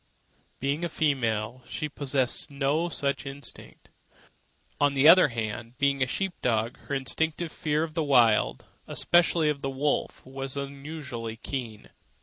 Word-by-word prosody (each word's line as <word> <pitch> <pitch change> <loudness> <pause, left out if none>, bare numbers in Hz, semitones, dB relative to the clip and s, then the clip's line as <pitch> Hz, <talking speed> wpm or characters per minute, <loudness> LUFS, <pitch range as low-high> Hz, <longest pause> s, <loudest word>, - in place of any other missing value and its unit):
Being 140 +5 -1
a 170 - -1
female, 125 -7 0
she 155 - -3
possessed 135 -3 -1
no 145 +4 0
such 140 -3 -2
instinct. 140 +1 -9 0.9
On 145 -1 +3
the 140 +2 +4
other 175 0 +9
hand, 115 0 -5
being 140 -1 +1
a 130 - +3
sheep 195 +7 -2
dog, 115 -1 0
her 140 - -1
instinctive 160 +5 0
fear 155 -2 0
of 160 -1 -5
the 165 - 0
Wild, 120 - +3 0.2
and - - -7
especially 170 -2 +3
of 150 -2 0
the 135 - -2
wolf, 140 +2 -1
was 135 +1 -5
unusually 140 -5 -6
keen. 115 -4 -6
140 Hz, 145 wpm, -27 LUFS, 125-150 Hz, 0.9 s, other